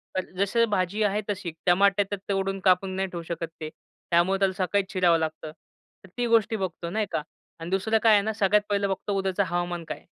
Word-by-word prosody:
तर 185 - -3
जशी 230 +4 +3
भाजी 200 +3 0
आहे 205 +1 +1
तशी. 190 -4 -3
टमाटे 195 +2 +4 0.3
तोडून 195 0 -1
कापून 185 0 +2
नाही 190 0 -1
ठेवू 170 -2 -6
शकत 165 0 -4
ते. 155 - -4 0.4
त्यामुळे 175 +3 +3
त्याला 195 -1 +2
सकाळीच 195 +1 0
चिरावं 175 -3 +4
लागतं. 155 -1 -4 0.5
तर 190 - -15
ती 245 - 0
गोष्टी 225 -1 +3
बघतो, 175 -4 -4
नाही 215 +4 -1
का 155 - -1 0.4
आणि 165 - -6
दुसरं 195 +4 +1
काय 225 -1 +6
आहे 205 - +5
ना, 220 +2 -2
सगळ्यात 210 0 +3
पहिलं 200 -1 +1
बघतो 195 +1 -3
उद्याचं 195 +1 0
हवामान 175 0 -2
काय - - -5
आहे. - - -21
195 Hz, 205 wpm, -26 LUFS, 175-205 Hz, 0.5 s, काय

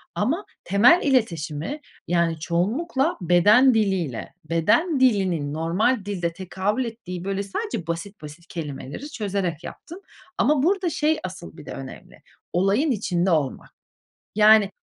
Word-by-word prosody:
Ama 305 - -1 0.2
temel 230 - +5
iletişimi, 175 - -1 0.3
yani, 170 -2 +1
çoğunlukla 265 - 0
beden 205 +10 +5
diliyle, 190 - -1
beden 260 - +2
dilinin 185 - +2
normal 190 +8 0
dilde 175 -5 -2
tekabül 190 +7 -2
ettiği 205 -6 -7
böyle 195 +1 -2
sadece 200 - -4
basit 170 +4 -5
basit 155 +3 -11
kelimeleri 155 - -7
çözerek 190 -6 -3
yaptım. 345 +4 -10 0.4
Ama 275 +2 +2
burada, 375 0 +1
şey, 310 0 0
asıl 185 -1 -9
bir 150 - -11
de - - -7
önemli, 135 -1 -10 0.3
olayın 200 - +2
içinde 185 -5 0
olmak. 150 -5 -1 0.7
Yani, 215 -1 +7
o - - -8
195 Hz, 130 wpm, -23 LUFS, 170-255 Hz, 0.7 s, Yani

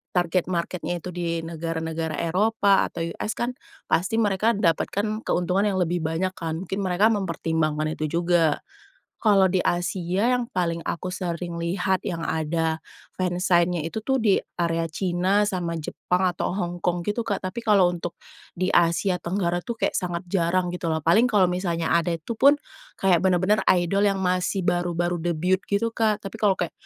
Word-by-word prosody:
target 175 0 +1
market-nya 175 0 -2
itu 180 - -6
di 170 -1 -2
negara-negara 165 -1 -3
Eropa 200 +3 +3
atau 170 - -6
US 215 - -3
kan, 240 +1 0 0.4
pasti 200 +6 +1
mereka 210 +2 +2
dapatkan 205 +4 0
keuntungan 180 +3 +1
yang 190 - 0
lebih 175 0 0
banyak 165 +4 0
kan, 160 0 -3
mungkin 195 +2 -3
mereka 190 +4 +3
mempertimbangkan 160 -5 -1
itu 155 +2 -1
juga. 170 -3 +2 0.6
Kalau 200 -3 +5
di 190 - +2
Asia, 180 +5 0
yang 245 -1 -3
paling 170 -2 -1
aku 185 - -3
sering 175 -2 -4
lihat 180 +2 0
yang 165 -2 -3
ada 160 0 -1 0.4
fansign-nya 175 -2 +1
itu 165 +7 -4
tuh 265 0 +1
di 205 -3 +4 0.2
area 165 -1 0
Cina 185 +4 +1
sama 175 -4 -2
Jepang 180 +3 -1
atau - - -1
Hongkong 175 -2 -2
gitu, 210 +3 -1
Kak. 200 -3 -2
Tapi 185 +6 -3
kalau 200 -5 +5
untuk, 175 0 -5 0.4
di 185 +1 -1
Asia 175 +2 +3
Tenggara 175 -1 -1
tuh 235 - -4
kayak - - +1
sangat 175 -1 -3
jarang 180 0 +1
gitu 180 - -4
loh. 160 -1 -1
Paling 215 +9 +5
kalau 205 -5 +4
misalnya 175 -2 -1
ada, 170 0 +1
itu 165 +6 -5
pun, 280 +2 +7 0.4
kayak 185 -3 +4
benar-benar 190 +3 +3
idol 185 +3 +1
yang 195 -1 +1
masih 185 +1 0
baru-baru 175 0 0
debut 175 +2 +1
gitu, 215 +3 +1
Kak. 215 -2 +1
Tapi 195 - -6
kalau 205 -3 +4
kayak 175 - -3
180 Hz, 165 wpm, -24 LUFS, 170-195 Hz, 0.6 s, pun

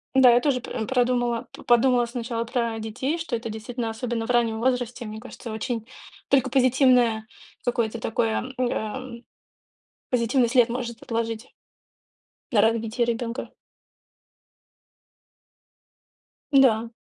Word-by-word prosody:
Да, 260 -2 +8
я 240 - +5
тоже 270 -3 +1
п 225 -2 -4
продумала, 245 -2 +1
п - - -12
подумала 240 0 +4
сначала 235 -1 -3
про 235 -1 -2
детей, 260 +9 -2
что 320 -7 -3
это 230 0 -4
действительно, 225 +2 -4
особенно 225 0 -3
в - - -14
раннем 230 -2 +2
возрасте, 245 -1 -1
мне 215 0 -7
кажется, 240 -1 -9
очень 225 +1 -3 0.4
только 265 -2 +3
позитивное 250 -4 +4 0.4
какое-то 235 -2 0
такое, 230 +3 -1
м, 250 - +2
эм, 240 +2 -5 0.9
позитивный 245 +1 +2
след 245 -1 +4
может 235 -1 -4
отложить 230 0 -3 1.0
на 210 - +4
развитие 230 +2 +1
и 235 - -1
ребёнка. 230 +1 -4 3.0
Да. 235 -5 +4
240 Hz, 125 wpm, -25 LUFS, 225-250 Hz, 3.0 s, Да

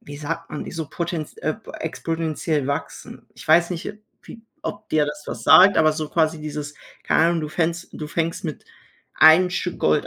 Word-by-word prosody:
wie 145 - -10
sagt 165 +3 -5
man, 150 - -6
so 160 -3 -5
potent 170 -2 -4
äh, - - -1 0.2
exponentiell 160 -3 -2
wachsen. 140 - -5
Ich - - -13
weiß 170 +3 +4
nicht 180 +4 -4 0.3
wie 230 - -12 0.2
ob 210 -8 -6
dir 155 -1 +2
das 150 0 -6
was - - -6
sagt, 195 +2 +8
aber 155 -1 +4
so 155 -1 -4
quasi 160 -1 +1
dieses, 150 -1 -6 0.3
keine 160 - +3
Ahnung, 170 -1 0
du 150 - -3
fängst 170 +2 -2
du 150 - -6
fängst 165 +2 -2
mit 155 -3 -5 0.5
einem 165 +4 +6
Stück 180 -1 -3
Gold 75 - +2
160 Hz, 185 wpm, -22 LUFS, 150-170 Hz, 0.5 s, sagt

